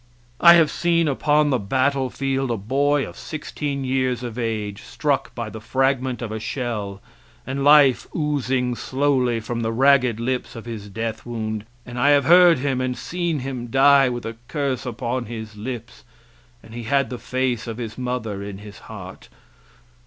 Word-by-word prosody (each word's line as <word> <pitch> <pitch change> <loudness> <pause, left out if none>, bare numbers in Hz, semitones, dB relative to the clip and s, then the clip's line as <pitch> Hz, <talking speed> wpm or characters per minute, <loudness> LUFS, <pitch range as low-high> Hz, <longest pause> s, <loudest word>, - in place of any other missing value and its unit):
I 170 0 +9
have 165 -3 +4
seen 170 -1 +1
upon 145 +1 +2
the 130 - +2
battlefield 135 +3 0
a 115 - 0
boy 140 +7 +1
sixteen 145 -2 -5
years 130 -2 0
of 120 -3 -5
age 105 -3 -3
struck 140 -3 -2
by 115 -3 -4
the 110 - -8
fragment 130 0 0
of 110 - -5
a 110 - -3
shell 105 -5 -4 0.4
and 135 +1 -3
life 145 -3 +6
oozing 135 -5 0
slowly 130 -2 0
from 115 +2 -4
the 110 0 -1
ragged 130 -2 +3
lips 125 +2 -2
of 115 - -8
his 110 -3 -7
death 110 +2 -4
wound, 110 -2 -4 0.2
and 120 0 -6
I 140 - +4
have 145 -1 +4
heard 175 -1 +7
him 130 -1 -1
and 125 -1 -2
seen 170 -4 -2
him 125 -2 -5
die 135 +2 +5
with 120 -1 -5
a 115 0 -6
curse 140 -4 -2
upon 120 +1 -3
his 110 -2 -7
lips, 115 +2 -7 0.6
and 110 - -14
he 120 -1 -6
had 135 +3 +1
the 125 - -5
face 130 -2 -2
of 115 -1 -5
his 115 -3 -5
mother 125 -5 -3
in 100 -1 -6
his 105 0 -11
heart. - - -10
125 Hz, 170 wpm, -22 LUFS, 115-140 Hz, 0.6 s, I